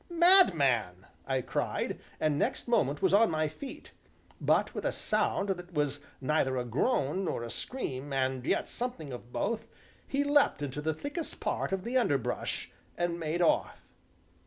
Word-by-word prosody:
"Madman!" 150 - +5 0.2
I 135 -1 +1
cried, - - -2 0.2
and 150 -2 +1
next - - -1
moment 145 - +1
was - - +3
on 220 +2 +6
my 155 -1 +1
feet; 255 - -9 0.5
but, - - +2
with - - -4
a - - +1
sound 200 - 0
that 180 -2 -4
was 145 -1 +1 0.2
neither 130 -2 +1
a 125 - -1
groan 145 - 0
nor 120 - -2
a 115 - -5
scream, 140 - -4
and 130 -1 0
yet - - +1
something 195 - -4
of 120 0 -9
both, 225 - -2 0.4
he 280 +1 +1
leapt 285 - +3
into 145 +1 -4
the 160 0 -1
thickest 290 - -5
part - - -1
of 190 -1 -1
the 245 +4 0
underbrush, 140 - -1 0.3
and 175 0 -1
made 165 +2 0
off. 165 - +1
155 Hz, 160 wpm, -30 LUFS, -, 0.5 s, on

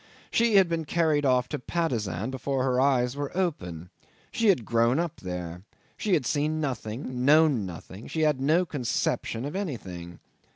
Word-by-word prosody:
She 230 -2 +3
had 195 -2 +7
been 165 -1 -2
carried 155 -3 +2
off 125 -1 +3
to 150 - -3
Patusan 120 - -2
before 130 0 -1
her 130 -1 +2
eyes 130 -2 +2
were 145 -1 -3
open. 90 - -2 0.4
She 230 - +1
had 170 - +3
grown 115 +3 +2
up 170 -1 -2
there; 90 -1 -6 0.3
she 205 -4 +1
had 145 -6 0
seen 150 +5 0
nothing, 125 -4 -3
she - - -5
had - - -7
known 140 -4 +4
nothing, 95 +4 -9
she 160 - -2
had 150 -4 +2
no 160 +6 +3
conception 125 -4 -2
of 145 +5 -5
anything. 95 - -5
135 Hz, 175 wpm, -27 LUFS, 115-160 Hz, 0.4 s, had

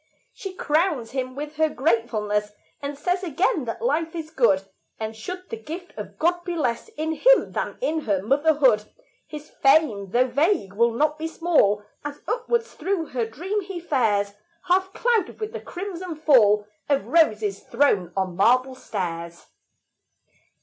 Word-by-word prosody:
She 385 -2 -7
crowns 300 -8 0
him 255 -1 -3
with 295 +1 -6
her 315 0 +3
gratefulness, 215 -6 0 0.3
And 285 0 -5
says 360 +5 0
again 345 - 0
that 230 - -5
life 330 -8 0
is 320 -2 -5
good; 220 -10 +3 0.4
And 220 0 -4
should 365 +12 -7
the 455 - -3
gift 355 -3 -8
of - - -8
God 345 +2 +1
be 350 -1 -3
less 245 - -1
In 315 +1 -1
him - - +4
than - - -3
in 320 -10 0
her 205 -10 0
motherhood, 275 -3 +3 0.4
His 300 0 -9
fame, 270 -9 +3
though 245 +6 +3
vague, 285 - +1
will 235 +3 +3
not 300 +5 +1
be 320 - -2
small, 310 - +2 0.2
As 290 0 -6
upward 470 -1 0
through 360 -5 -3
her 240 -3 -1
dream 370 - -3
he 380 -2 -6
fares, 215 -11 +1 0.3
Half 375 +1 +2
clouded 455 -5 0
with 430 0 -5
a - - -5
crimson 360 -2 -6
fall 225 -9 +4 0.2
Of 280 -1 +2
roses 215 - +2
thrown 200 -11 +1
on 185 -2 -1
marble 255 +7 +3
stairs. 170 -8 -5
295 Hz, 155 wpm, -24 LUFS, 225-345 Hz, 0.4 s, him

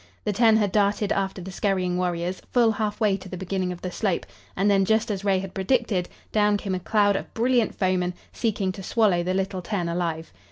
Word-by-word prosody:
The 210 - 0
ten 225 +1 +5
had 205 -3 +1
darted 205 0 +1
after 190 -1 -1
the 190 - -7
scurrying 185 -2 0
warriors, 180 0 -2
full 235 -3 +4
half 215 -1 -2
way 210 -4 +2
to 190 0 -11
the 185 - -6
beginning 185 0 -2
of 175 - -8
the 185 - -3
slope, 195 -2 -1 0.3
and 195 +2 +2
then, 200 -1 +4
just 220 +3 +1
as 200 -1 -3
Ray 195 -2 +3
had 190 0 -5
predicted, 195 -2 0 0.2
down 210 -1 +3
came 200 -2 -3
a 185 - -1
cloud 205 +1 +2
of - - -4
brilliant 240 0 +2
foemen, 180 -2 0 0.2
seeking 210 -5 -1
to 195 - -8
swallow 195 -2 +2
the 185 +2 -1
little 190 -1 -1
ten 180 -2 -2
alive. 170 -1 -3
195 Hz, 215 wpm, -25 LUFS, 185-210 Hz, 0.3 s, ten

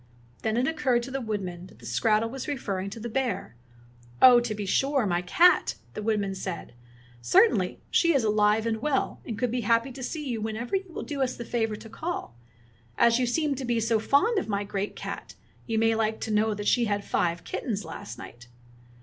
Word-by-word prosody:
Then 220 0 0
it 250 - +2
occurred 265 -7 +1
to 265 - -7
the 270 0 -2
woodman 185 -6 -4
that - - -18
the 120 - -15
skrattel 215 - +2
was 270 0 -6
referring 200 -9 -3
to 215 - -8
the 230 - -5
bear. 245 - -2 0.6
"Oh, 250 -2 +9
to 240 -3 -3
be 205 -1 -4
sure, 270 +5 +2
my 175 -3 +1
cat," 345 - +4 0.2
the - - -5
woodman 205 -2 0
said. 190 -6 -6 0.5
"Cer 385 - +6
tainly, - - -1
she 335 - +4
is 265 - +3
alive 210 +1 +3
and 225 -1 -1
well, 285 -1 -1
and 220 -3 -4
would 250 -2 0
be 245 0 -1
happy 230 +4 +2
to 260 +1 -9
see 300 +3 -4
you 235 -4 -2
whenever 220 - -3
you 380 -2 -3
will - - -5
do 285 -2 -4
us 255 -1 0
the 235 - -7
favor 225 -3 -1
to 225 - -11
call. 270 - -5 0.6
And 235 - +6
as 235 - +3
you 250 - +1
seem 300 +4 +1
to 270 0 -5
be 240 -2 0
so 225 0 +2
fond 390 - +3
of 360 - -6
my 200 0 0
great 200 0 -3
cat, - - -7 0.3
you 225 -2 -1
may 225 0 +3
like 220 0 0
to 220 - -3
know 215 0 +2
that 205 0 -4
she 240 -2 +3
had 205 -2 -1
five 170 -1 0
kittens 210 -5 -3
last 205 - -8
night." 120 +1 -11
225 Hz, 220 wpm, -27 LUFS, 210-260 Hz, 0.6 s, Oh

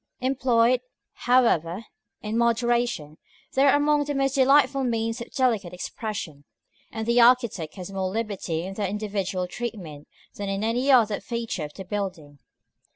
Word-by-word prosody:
§ - - -55 0.2
X. 255 - 0
Employed, 245 -2 +2 0.3
however, 230 -6 +2 0.4
in 215 +1 -3
moderation, 235 -8 0 0.3
they 265 - +2
are 275 - +5
among 295 0 +2
the 290 0 -3
most 270 -1 +1
delightful 275 0 +4
means 230 -1 -1
of - - -8
delicate 225 - 0
expression; 180 -7 -6 0.5
and 220 0 -4
the 235 +1 +4
architect 235 - +3
has 185 0 -8
more 190 -1 -2
liberty 195 -6 -3
in 190 +2 -6
their 200 0 -2
individual 200 -2 -2
treatment 180 -8 -7 0.3
than 200 -1 -5
in 195 +1 -2
any 245 +5 0
other 225 -6 +4
feature 230 -6 -4
of 150 - -11
the 190 - -8
building. 180 -8 -5
225 Hz, 155 wpm, -25 LUFS, 190-245 Hz, 0.5 s, are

